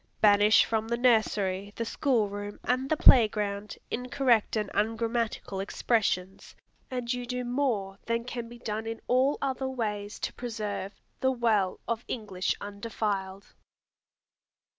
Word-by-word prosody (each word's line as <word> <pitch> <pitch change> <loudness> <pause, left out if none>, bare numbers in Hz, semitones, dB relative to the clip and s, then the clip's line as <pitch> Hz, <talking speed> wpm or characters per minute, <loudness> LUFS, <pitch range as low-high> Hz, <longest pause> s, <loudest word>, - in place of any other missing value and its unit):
Banish 210 0 +6
from 220 -1 -1
the 235 +1 0
nursery, 205 -5 +2
the 230 - -2
school 235 -3 +1
room, 205 0 -6
and 255 +2 0
the 315 - +2
play 240 -6 +8
ground, 205 -1 -4
incorrect 250 -2 +1
and 210 -2 -1
ungrammatical 225 -2 -1
expressions, 195 -2 -1 0.3
and 250 -1 -2
you 245 0 -3
do 250 +1 -3
more 240 -7 -1
than 230 0 0
can 240 -1 -5
be 240 - -10
done 220 -1 -4
in 225 0 -4
all 260 +3 +3
other 265 -1 -1
ways 210 -5 -3
to - - -2
preserve 210 -4 -4 0.2
"the 260 - +2
well 220 -7 +1
of 235 0 -2
English 200 -6 -2
undefiled." 200 -2 -4
225 Hz, 140 wpm, -28 LUFS, 205-245 Hz, 0.3 s, play